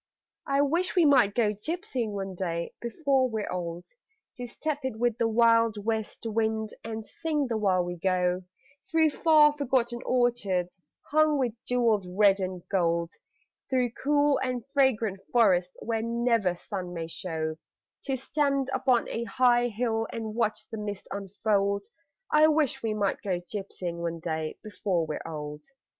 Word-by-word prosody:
I 275 0 +3
wish 335 +7 +1
we 350 -3 +5
might 255 -8 +5
go 215 -3 +2
gypsying 255 - -3
one 195 -1 -4
day 170 -2 -3
before 260 +1 +1
we're 220 -2 -3
old 175 -1 -4 0.5
To 245 -1 -5
step 295 +4 -3
it 260 -4 -3
with 240 -1 0
the 230 - +3
wild 230 0 +4
west 220 0 -2
wind 220 -1 0
And 220 -1 -5
sing 310 0 -2
the 235 -3 -1
while 185 -4 +2
we 175 0 -5
go, 180 0 +1 0.5
Through 320 -2 +3
far 305 -1 +5
forgotten 250 -4 0
orchards 205 -8 0 0.3
Hung 310 0 +4
with 250 -5 0
jewels 230 -6 +2
red 195 +2 +4
and 185 -2 -4
gold; 170 -2 +1 0.6
Through 250 -3 +1
cool 290 +3 +2
and 250 -3 -2
fragrant 230 -8 +2
forests 185 -6 +3
where 225 -1 -1
never 230 -5 +1
sun 180 -1 -6
may 165 -1 -3
show, 160 -2 -4 0.5
To 270 -2 -1
stand 275 0 0
upon 255 -2 +2
a 235 - -3
high 240 +2 +3
hill 225 0 -1
and 220 -2 -4
watch 220 -1 -1
the 220 - -5
mist 205 -2 -5
unfold 200 0 0 0.5
I 305 +1 +6
wish 310 -4 +1
we 220 -2 -1
might 200 -2 0
go 190 -4 -1
gypsying 180 -2 -5
one 170 -1 -3
day 160 -1 -3
before 185 -5 -1
we're 155 -1 -4
old. 150 -2 -6
220 Hz, 155 wpm, -28 LUFS, 185-255 Hz, 0.6 s, I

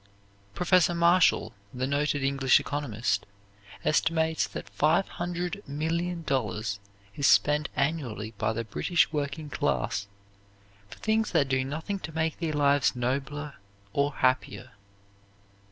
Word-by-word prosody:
Professor 180 -1 +3
Marshall, 170 +1 +4 0.2
the 125 0 -2
noted 145 +1 0
English 135 -1 +4
economist, 125 -7 -2 0.6
estimates 160 +1 +2
that - - -9
$500,000,000 165 - -1 0.4
is 140 - +2
spent 150 0 +4
annually 135 -7 -2
by 110 0 +1
the 115 +1 -3
British 165 - +1
working 145 +1 -3
classes 100 0 -1 0.8
for - - -11
things 220 0 +1
that 145 -5 +3
do 130 0 +1
nothing 160 +9 -4
to 160 - -7
make 160 0 -1
their 165 -3 -2
lives 145 -2 +3
nobler 140 +4 -3 0.4
or 140 0 +1
happier. 130 0 0
145 Hz, 110 wpm, -28 LUFS, 130-165 Hz, 0.8 s, Marshall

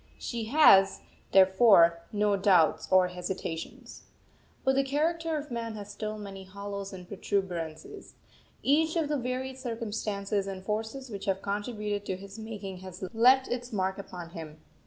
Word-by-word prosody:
She 230 -2 -4
has, 215 -7 +6 0.3
therefore, 190 -3 +6
no 210 -1 +2
doubts 190 -5 +3
or 185 -1 +5
hesitations. 180 -2 -6 0.6
But 265 - +3
the 275 +1 +3
character 320 +4 0
of 295 -2 -7
man 230 -2 -4
has 205 -1 -8
still 215 +1 -5
many 195 -2 -8
hollows 200 +1 -6
and 180 -2 -10
protuberances; 190 - -4 0.5
each 315 +4 +3
of 320 -3 0
the 300 - +1
varied 260 +1 -3
circumstances 210 -4 -3
and 190 -1 -6
forces 225 +5 -3
which 200 -2 -6
have 195 -1 -1
contributed 205 0 -3
to 185 - -2
his 200 +3 -10
making 205 -4 -6
has 185 0 -9
left 255 +4 +5
its 245 0 -4
mark 190 -2 -1
upon 175 -3 -8
him. 155 -2 -9
205 Hz, 150 wpm, -29 LUFS, 190-240 Hz, 0.6 s, has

